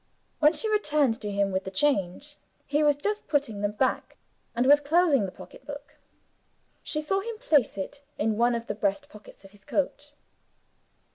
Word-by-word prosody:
When 300 +1 +5
she 390 +8 -1
returned 300 - +1
to 210 - -4
him 200 -1 0
with 190 0 -1
the - - -5
change, 270 +4 -1 0.3
he 290 +1 0
had 290 -1 +2
just 420 0 -2
put 290 -1 +2
them 205 -5 -3
back, 255 +5 -1 0.4
and 240 +2 +1
was 290 +2 +7
closing 290 - +3
the - - -8
pocketbook. 285 +9 -11 0.9
She 305 - -2
saw 390 +6 0
him 455 +2 -6
place 300 - +2
it 280 +9 -6 0.2
in 215 +1 0
one 240 +2 +2
of 230 0 -4
the - - -3
breast 210 +7 -2
pockets 210 -3 -15
of 195 - -14
his 205 -1 -21
coat. 290 0 -2
285 Hz, 180 wpm, -27 LUFS, 210-300 Hz, 0.9 s, was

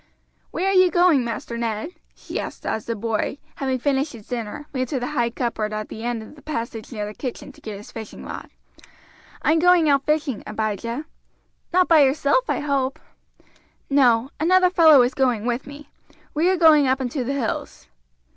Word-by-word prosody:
"Where 375 - -2
are 390 - +2
you 370 -1 +6
going, 345 -7 +4
Master 235 0 -5
Ned?" 225 +4 -2 0.3
she - - -6
asked - - -7
as 220 - -2
the 230 - -1
boy, 225 +4 -2 0.2
having 265 -2 -1
finished 275 +3 0
his 220 -3 -12
dinner, 245 +5 -5
ran 255 -1 -1
to 265 +1 -2
the 245 - -3
high 240 -5 +1
cupboard 230 -3 -3
at 215 0 -4
the 220 - -8
end 240 -2 -2
of - - -13
the 290 - -16
passage 230 -6 -5
near 210 -3 -4
the 210 - -7
kitchen 250 +2 -6
to - - -20
get 215 -2 -6
his 205 - -12
fishing 220 -2 -9
rod. - - -7 0.9
"I - - +3
am 325 - +3
going 350 -2 +5
out 280 -1 +3
fishing, 300 -6 0
Abijah." 220 +5 -3 0.7
"Not 365 +1 +3
by 325 -2 +6
yourself, 285 - +3
I - - 0
hope?" 275 -2 -1 0.9
"No; 255 -2 +4
another 365 +3 +4
fellow 315 -7 +7
is 245 - 0
going 250 -5 +1
with 245 +2 -2
me. 285 +1 -11 0.4
We 320 +4 +2
are 375 - +2
going 310 -4 +6
up 260 +1 +2
into 260 +1 -2
the 265 +3 -2
hills." 250 -6 -4
265 Hz, 195 wpm, -23 LUFS, 230-300 Hz, 0.9 s, fellow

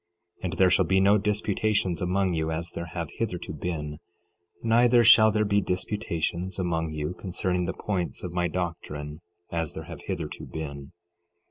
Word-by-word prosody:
And 90 0 -2
there 95 -1 +4
shall 95 +1 +4
be 95 +3 +3
no 100 +2 +5
disputations 105 -2 0
among 95 +1 +1
you, 80 -1 -1
as 85 +1 -3
there 85 - -5
have 85 -1 -4
hitherto 90 -8 -3
been; 75 -1 -4 0.6
neither 120 +1 +5
shall 110 -1 +8
there 105 0 +2
be 100 0 +3
disputations 90 -1 -2
among 85 -3 -1
you 75 +2 -3
concerning 90 -1 -1
the - - -2
points 95 -5 -3
of 90 -1 -5
my 90 0 +1
doctrine, 80 -3 -4 0.3
as 80 -3 -2
there - - -6
have - - -9
hitherto - - -4
been. 70 -2 -6
90 Hz, 160 wpm, -27 LUFS, 80-100 Hz, 0.6 s, shall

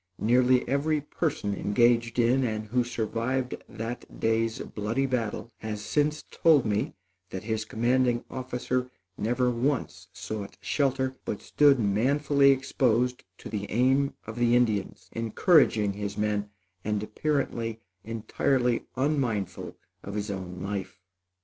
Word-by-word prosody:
Nearly 125 +2 +3
every 145 +4 +1
person 145 -7 -2
engaged 115 +3 +2
in 125 +3 +3
and 110 -3 -2
who 125 +2 +2
survived 120 +2 -2 0.2
that 115 +2 -7
day's 115 0 +1
bloody 115 +6 -2
battle 120 -3 -2
has 105 -1 -5
since 150 +4 +1
told 155 -6 +4
me 105 -1 -1 0.3
that 95 - -6
his 110 0 -2
commanding 120 +2 +1
officer 125 0 -2 0.3
never 125 +4 +1
once 120 -7 -1
sought 100 0 -6
shelter, 130 -2 0
but 105 - -3
stood 145 -2 +4
manfully 140 +7 +3
exposed 125 -2 +1
to - - -9
the 105 -2 -4
aim 130 +4 +2
of 115 +1 -7
the 120 0 +4
Indians, 110 -6 0
encouraging 115 - +3
his 100 0 -5
men 105 -1 0 0.3
and 105 0 -1
apparently 115 -2 -2 0.2
entirely 120 +2 0
unmindful 130 - -1 0.2
of 100 - -7
his 105 0 -2
own 90 -2 -6
life. 95 -2 -4
120 Hz, 125 wpm, -27 LUFS, 105-130 Hz, 0.3 s, told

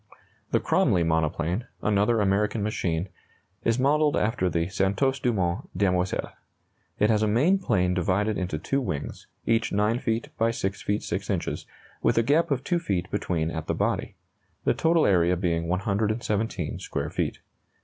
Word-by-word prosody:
The - - +2
Cromley 85 -2 +2
monoplane, 80 +6 0 0.2
another 105 +2 +2
American 105 +2 +1
machine, 90 -4 -1 0.6
is 115 0 +2
modelled 145 +3 +3
after 105 -4 +1
the 85 0 0
Santos 100 +8 +1
Dumont 95 -9 -1
Demoiselle. 90 -2 0 0.7
It 105 +2 +3
has 105 -1 +2
a 110 - +2
main 145 - +3
plane 90 - +1
divided 95 +4 +1
into 90 -4 -2
two 135 - -1
wings, 75 - -5 0.2
each 115 0 +1
9 105 +4 +1
feet 115 -2 -2
by 115 +1 +3
6 100 -4 -3
feet 105 +1 -1
6 - - -3
inches, - - -2 0.3
with - - +2
a 115 - +5
gap 155 +7 +3
of 135 -3 0
2 175 +2 +1
feet 95 - -2
between 85 -5 -1
at 80 -1 -5
the - - 0
body; - - -1 0.5
the - - +3
total 165 -1 +3
area 90 -2 +3
being 85 -2 0
117 105 0 -1
square - - -4
feet. - - -2
105 Hz, 160 wpm, -26 LUFS, 90-115 Hz, 0.7 s, a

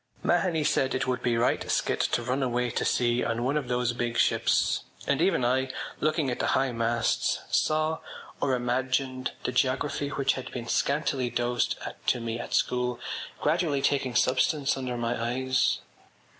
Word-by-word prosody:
Mahony 165 -5 +2
said 135 -2 +1
it - - 0
would 125 -1 -1
be 120 -2 +1
right 120 +2 +1
skit - - +1
to 120 - +1
run 130 +3 -1
away 125 -1 0
to - - -1
sea 120 0 +2
on 115 +1 -1
one 135 +4 0
of 150 -4 -1
those 125 0 0
big 120 0 -2
ships - - +2 0.2
and - - +1
even 125 - +2
I, 130 +2 +1 0.3
looking 155 -3 +1
at 120 - -4
the - - 0
high 135 -1 +1
masts, 115 0 +1
saw, 155 +1 +1 0.4
or 135 -2 +2
imagined, 130 +1 -1
the - - -1
geography 140 +3 0
which 140 -1 +1
had 130 - -6
been 120 -2 -6
scantily 140 -3 0
dosed 120 0 0 0.3
to - - +3
me 115 0 -3
at - - -3
school 125 -1 0 0.4
gradually 150 -3 +1
taking 135 -3 +1
substance 135 +3 +2
under 130 -2 -3
my 120 0 -1
eyes. 130 +2 +1
125 Hz, 170 wpm, -27 LUFS, 120-135 Hz, 0.4 s, to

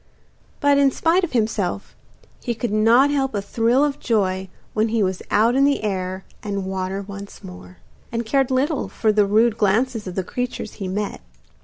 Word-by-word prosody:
But, 285 -1 +4
in 280 -1 +5
spite 335 +7 +2
of 345 - -2
himself, 215 -4 -1 0.5
he 240 - -2
could 230 0 -3
not 235 +6 +5
help 270 -4 0
a - - +1
thrill 235 +6 +2
of 290 -1 -1
joy 190 -4 0 0.2
when 215 +1 +2
he 225 -1 +1
was 185 -1 -1
out 225 +3 +3
in 270 +2 +3
the 280 -4 +2
air 190 -2 -3 0.2
and 200 -2 -3
water 190 +1 -3
once 200 0 -10
more, 90 0 -11 0.3
and 230 0 -2
cared 270 +3 +1
little 275 +3 0
for 220 - +1
the 210 -1 +3
rude 220 +2 +3
glances 220 +2 +1
of 180 - -6
the 190 - -1
creatures 245 +1 -4
he 190 - -2
met. 200 - -3
215 Hz, 185 wpm, -22 LUFS, 195-255 Hz, 0.5 s, in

